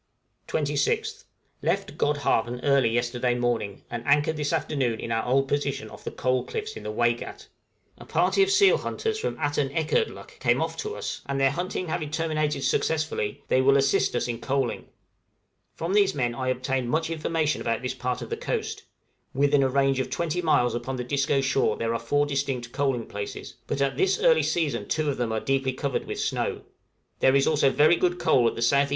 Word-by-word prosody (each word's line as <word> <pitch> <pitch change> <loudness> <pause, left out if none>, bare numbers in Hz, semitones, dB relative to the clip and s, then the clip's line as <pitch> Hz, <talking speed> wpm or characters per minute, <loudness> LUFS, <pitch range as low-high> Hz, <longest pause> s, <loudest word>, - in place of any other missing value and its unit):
{COALING.} 150 - 0
26th. 145 -1 -1 0.4
Left - - -1
Godhavn 125 -5 0
early 140 -4 +4
yesterday 120 +1 0
morning, 120 -5 -2
and 120 -1 -4
anchored 145 +2 +3
this 150 -1 -2
afternoon 135 -8 0
in 115 - -5
our 115 0 0
old 135 +2 +2
position 145 0 -2
off - - -12
the - - -3
Coal 130 0 0
Cliffs 435 - -5
in - - -7
the 105 - -5
Waigat; 120 +2 -1 0.5
a - - -11
party 395 - +2
of 390 - +4
seal 395 0 +5
hunters 440 -1 -2
from 465 - -3
Atanekerdluk 145 - -1
came - - +2
off - - -2
to 430 0 -4
us, - - -5
and 140 0 -1
their 135 0 +4
hunting 180 +3 -3
having 160 -2 -2
terminated 155 -3 -1
successfully, 155 -12 -1
they 130 - +3
will 135 +1 +5
assist 135 -2 +2
us 120 - 0
in 115 -1 -3
coaling. 135 -2 -1 0.9
From 170 +3 -3
these 200 -2 +3
men 120 -4 0
I 130 +2 -4
obtained 130 0 -1
much 160 +3 0
information 160 -1 -1
about 115 +2 -1
this 125 0 -2
part 125 -1 -3
of 115 - -10
the - - -1
coast; - - -3 0.5
within 140 +1 +3
a 135 - +3
range 135 0 +2
of 130 -1 -2
20 170 +5 -1
miles 125 -8 +2
upon 120 +3 -3
the 125 - -3
Disco 140 +2 +1
shore 135 0 +1
there 115 0 -1
are 115 - -1
four 145 +6 +1
distinct 135 -4 -2
coaling 135 -4 0
places; 100 0 -6
but 140 - -2
at 140 -1 0
this 385 - +2
early - - +5
season 140 -11 -1
two 155 -2 0
of - - -5
them 120 -2 -1
are 110 - 0
deeply 135 +1 0
covered 135 0 -2
with - - -4
snow. - - -2 0.6
There 130 +1 +4
is 140 - +4
also 145 -3 +3
very 155 +5 +4
good 180 -1 +1
coal 125 -8 +3
at - - -1
the 115 - -2
S.E. 140 +2 +3
135 Hz, 200 wpm, -26 LUFS, 125-155 Hz, 0.9 s, seal